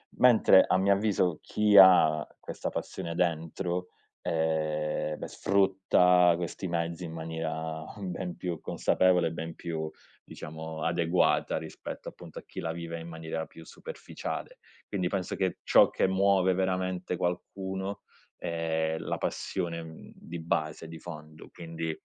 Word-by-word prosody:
Mentre 115 Hz, -6 st, +7 dB
a -, -, +3 dB
mio 100 Hz, +1 st, +4 dB
avviso, 95 Hz, -5 st, +1 dB
chi 105 Hz, -1 st, +3 dB
ha 80 Hz, -5 st, +7 dB
questa -, -, -5 dB
passione 85 Hz, 0 st, -5 dB
dentro, 90 Hz, +1 st, -1 dB, 0.3 s
ehm, 80 Hz, -1 st, -1 dB
sfrutta 95 Hz, -2 st, +4 dB
questi 85 Hz, +2 st, -4 dB
mezzi 85 Hz, 0 st, -2 dB
in 80 Hz, -, -7 dB
maniera 80 Hz, -1 st, -4 dB, 0.2 s
ben 90 Hz, -2 st, -4 dB
più 85 Hz, -3 st, -4 dB
consapevole 90 Hz, -2 st, +2 dB
e 80 Hz, -, -3 dB
ben 80 Hz, 0 st, -6 dB
più, 80 Hz, -2 st, -4 dB, 0.3 s
diciamo, 80 Hz, 0 st, -7 dB
adeguata 85 Hz, +1 st, +2 dB
rispetto, -, -, -7 dB
appunto, -, -, -13 dB
a -, -, -14 dB
chi -, -, -8 dB
la 80 Hz, -, -2 dB
vive 85 Hz, 0 st, -5 dB
in 80 Hz, -, -8 dB
maniera 80 Hz, -1 st, -5 dB
più 80 Hz, -, -13 dB
superficiale. -, -, -7 dB, 0.3 s
Quindi 95 Hz, -3 st, -1 dB
penso 95 Hz, -1 st, -2 dB
che 95 Hz, -1 st, -1 dB
ciò -, -, +6 dB
che -, -, +1 dB
muove 95 Hz, -1 st, +3 dB
veramente 90 Hz, -1 st, -1 dB
qualcuno 95 Hz, +2 st, -3 dB, 0.4 s
è 80 Hz, -1 st, -1 dB
la -, -, -3 dB
passione, 85 Hz, -3 st, -3 dB
mhmm, 80 Hz, 0 st, -11 dB
di 85 Hz, +1 st, -8 dB
base, 80 Hz, -1 st, -2 dB
di 80 Hz, 0 st, -9 dB
fondo, 80 Hz, -2 st, -10 dB
quindi 80 Hz, -1 st, -5 dB
85 Hz, 135 wpm, -29 LUFS, 80-95 Hz, 0.4 s, Mentre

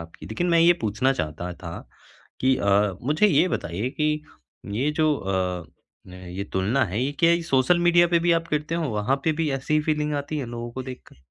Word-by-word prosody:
आपकी, 85 Hz, 0 st, -11 dB
लेकिन 140 Hz, +11 st, -2 dB
मैं 170 Hz, -, +4 dB
ये 170 Hz, +1 st, +7 dB
पूछना 110 Hz, +5 st, +1 dB
चाहता 85 Hz, -, -4 dB
था 85 Hz, -1 st, -6 dB, 0.6 s
कि 130 Hz, 0 st, +3 dB
अ, 100 Hz, 0 st, +2 dB
मुझे 150 Hz, -, +3 dB
ये 190 Hz, -, +4 dB
बताइए 100 Hz, -, -2 dB
कि 150 Hz, +1 st, 0 dB, 0.6 s
ये 140 Hz, +5 st, +1 dB
जो 155 Hz, -1 st, +3 dB
अ, 90 Hz, -4 st, -2 dB, 0.5 s
ये 90 Hz, +1 st, -7 dB
तुलना 105 Hz, +8 st, +1 dB
है, 100 Hz, +3 st, -3 dB
ये 140 Hz, +2 st, -1 dB
क्या 165 Hz, 0 st, +5 dB
ये 170 Hz, 0 st, +2 dB
सोशल 165 Hz, +2 st, +2 dB
मीडिया 175 Hz, 0 st, +5 dB
पे 170 Hz, -1 st, +3 dB
भी 170 Hz, +1 st, +1 dB
आप 165 Hz, 0 st, +1 dB
करते 150 Hz, +2 st, -2 dB
हो? 165 Hz, -3 st, -1 dB
वहाँ 105 Hz, +5 st, 0 dB
पे 160 Hz, -, +3 dB
भी 155 Hz, -, +1 dB
ऐसी 135 Hz, +3 st, -1 dB
ही 155 Hz, -, +4 dB
फीलिंग 150 Hz, -1 st, -1 dB
आती 145 Hz, +2 st, -3 dB
है 135 Hz, -, -4 dB
लोगों 120 Hz, 0 st, -6 dB
को 130 Hz, +1 st, -5 dB
देखकर? 130 Hz, -1 st, -10 dB
135 Hz, 210 wpm, -24 LUFS, 100-155 Hz, 0.6 s, ये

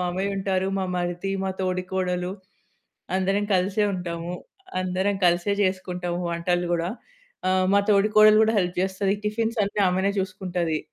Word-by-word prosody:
మామయ్య 185 Hz, +3 st, -1 dB
ఉంటారు. 190 Hz, -1 st, 0 dB
మా 190 Hz, -, 0 dB
మరిది, 175 Hz, +2 st, -2 dB
మా 190 Hz, -, -1 dB
తోడికోడలు 185 Hz, 0 st, -1 dB, 0.9 s
అందరం 195 Hz, +2 st, +1 dB
కలిసే 195 Hz, +3 st, +1 dB
ఉంటాము. 175 Hz, -1 st, -4 dB, 0.5 s
అందరం 185 Hz, +2 st, 0 dB
కలిసే 175 Hz, +3 st, +2 dB
చేసుకుంటాము 180 Hz, -2 st, -2 dB
వంటలు 175 Hz, +1 st, 0 dB
గూడా. 170 Hz, +2 st, -1 dB, 0.6 s
ఆహ్, 185 Hz, 0 st, +2 dB
మా 200 Hz, -, +6 dB
తోడి 200 Hz, +1 st, +4 dB
కోడలు 215 Hz, 0 st, +8 dB
కూడా 220 Hz, +1 st, +1 dB
హెల్ప్ 180 Hz, -1 st, -2 dB
జేస్తది. 190 Hz, +1 st, 0 dB
టిఫిన్స్ 225 Hz, +2 st, -1 dB
అన్నీ 200 Hz, +1 st, -2 dB
ఆమెనే 190 Hz, +2 st, +1 dB
చూసుకుంటది. 180 Hz, -4 st, -2 dB
185 Hz, 135 wpm, -25 LUFS, 180-195 Hz, 0.9 s, కోడలు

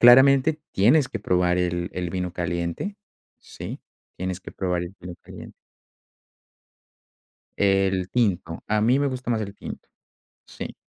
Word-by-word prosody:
Claramente 135 Hz, +5 st, +7 dB
tienes 130 Hz, +8 st, +4 dB
que 115 Hz, -, -5 dB
probar 90 Hz, -2 st, +2 dB
el 90 Hz, 0 st, -1 dB
el 90 Hz, -2 st, -2 dB
vino 90 Hz, -2 st, -2 dB
caliente. 85 Hz, -, -2 dB, 0.4 s
Sí, -, -, -8 dB, 0.4 s
tienes 95 Hz, 0 st, -3 dB
que -, -, -10 dB
probar 90 Hz, -2 st, -1 dB
el 90 Hz, +3 st, -7 dB
vino 90 Hz, 0 st, -7 dB
caliente. -, -, -10 dB, 2.1 s
El 95 Hz, -2 st, +2 dB
tinto. 95 Hz, -8 st, 0 dB
A 105 Hz, 0 st, +2 dB
mí 125 Hz, +5 st, +4 dB
me 145 Hz, -, +2 dB
gusta 130 Hz, -2 st, -3 dB
más 110 Hz, -1 st, +1 dB
el 100 Hz, -1 st, -5 dB
tinto, -, -, -9 dB, 0.6 s
sí. -, -, -7 dB
95 Hz, 140 wpm, -25 LUFS, 90-120 Hz, 2.1 s, Claramente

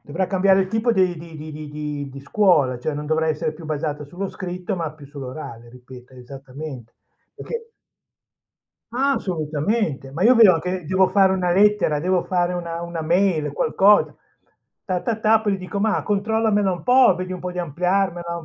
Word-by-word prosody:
Dovrà 170 Hz, +6 st, -3 dB
cambiare 195 Hz, 0 st, +3 dB
il 190 Hz, -, -1 dB
tipo 225 Hz, +3 st, +1 dB
di 185 Hz, -5 st, +1 dB
di 165 Hz, 0 st, -11 dB
di 155 Hz, +1 st, -8 dB
di 150 Hz, 0 st, -8 dB
di 150 Hz, -1 st, -5 dB
di 140 Hz, +1 st, -10 dB
scuola, 145 Hz, -5 st, +2 dB
cioè 145 Hz, +5 st, -3 dB
non 150 Hz, +1 st, -5 dB
dovrà 160 Hz, +1 st, 0 dB
essere 155 Hz, 0 st, -1 dB
più 160 Hz, +1 st, -11 dB
basata 150 Hz, -1 st, -3 dB
sullo 180 Hz, +7 st, -6 dB
scritto 180 Hz, +1 st, -5 dB
ma 165 Hz, -4 st, -3 dB
più 150 Hz, -2 st, -14 dB
sull'orale, 130 Hz, -4 st, -9 dB
ripeto, 125 Hz, +1 st, -14 dB
esattamente, 130 Hz, 0 st, -10 dB, 0.4 s
perché 460 Hz, -1 st, -7 dB, 1.2 s
Ma 270 Hz, +3 st, +1 dB
assolutamente, 155 Hz, -, -2 dB
ma 165 Hz, -, -3 dB
io 245 Hz, +4 st, +6 dB
vedo 195 Hz, -8 st, +6 dB
che 180 Hz, +1 st, -4 dB
devo 185 Hz, +3 st, +2 dB
fare 190 Hz, 0 st, +4 dB
una 180 Hz, -2 st, 0 dB
lettera, 205 Hz, -5 st, +3 dB
devo 180 Hz, +3 st, +1 dB
fare 180 Hz, -1 st, 0 dB
una 170 Hz, -1 st, -4 dB
una 170 Hz, -1 st, -5 dB
mail, 170 Hz, -2 st, +1 dB
qualcosa. 195 Hz, +8 st, +3 dB, 0.7 s
Ta, 185 Hz, -2 st, -2 dB
ta, 230 Hz, -3 st, -2 dB
ta, 220 Hz, 0 st, +4 dB
poi 210 Hz, -2 st, 0 dB
gli -, -, -2 dB
dico: 185 Hz, +2 st, -5 dB
"Ma 220 Hz, +1 st, +1 dB
controllamela 210 Hz, -1 st, +1 dB
un 175 Hz, -3 st, -5 dB
po', 255 Hz, +1 st, +6 dB
vedi 185 Hz, 0 st, -5 dB
un 180 Hz, -, -6 dB
po' 180 Hz, -, -4 dB
di 180 Hz, -, -7 dB
ampliarmela 175 Hz, +1 st, -1 dB
un 170 Hz, -, -8 dB
175 Hz, 185 wpm, -22 LUFS, 150-195 Hz, 1.2 s, io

